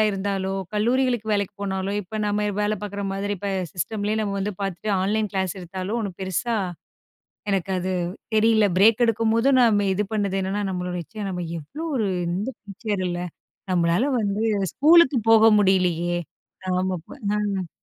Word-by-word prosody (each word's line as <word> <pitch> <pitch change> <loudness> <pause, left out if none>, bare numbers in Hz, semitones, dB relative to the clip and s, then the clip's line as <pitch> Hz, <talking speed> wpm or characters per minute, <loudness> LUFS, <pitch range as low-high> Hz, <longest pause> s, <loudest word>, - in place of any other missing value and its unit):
இருந்தாலோ! 195 -1 -2 0.2
கல்லூரிகளுக்கு 240 +1 +1
வேலைக்கு 200 -1 -1
போனாலோ! 190 0 -2
இப்ப 195 +4 -8
நம்ம 210 0 0
வேல 210 +1 +1
பார்க்குற 205 0 -4
மாதிரி, 200 +1 -2
இப்ப 200 +2 -3 0.2
சிஸ்டம்லயே 205 +4 -2
நம்ம 200 -2 -2
வந்து 205 +2 -2
பார்த்துட்டு, 195 +2 -4
ஆன்லைன் 210 +1 0
கிளாஸ் 190 -1 -1
எடுத்தாலோ! 185 +4 -5
ஒன்னும் 200 -5 -5
பெருசா 220 +5 -1 1.0
எனக்கு 195 -1 0
அது 185 +1 -2 0.4
தெரியல. 220 0 +4
பிரேக் 220 +4 +5
எடுக்கும்போதும் 230 +4 +3
நம்ம 205 -4 +4
இது 210 - 0
பண்ணது 200 -2 0
என்னன்னா, 195 +2 -2
நம்மளோட 180 -1 -3
ச்சே! 215 -1 -8
நம்ம 180 -1 -3 0.2
எவ்ளோ 290 - -7
ஒரு 220 -4 +1 0.2
இந்த 200 +8 -2
டீச்சர் 205 -1 -3
இல்ல. 175 0 -3 0.5
நம்மளால 175 +5 +2 0.2
வந்து 205 +1 -1 0.3
ஸ்கூலுக்கு 305 -3 +6
போக 225 0 +7
முடியலயே! 175 -3 +2 0.6
ஆமா, 185 0 0
அப்ப 160 - -18 0.3
அ. 195 -4 -2
200 Hz, 150 wpm, -24 LUFS, 190-220 Hz, 1.0 s, போக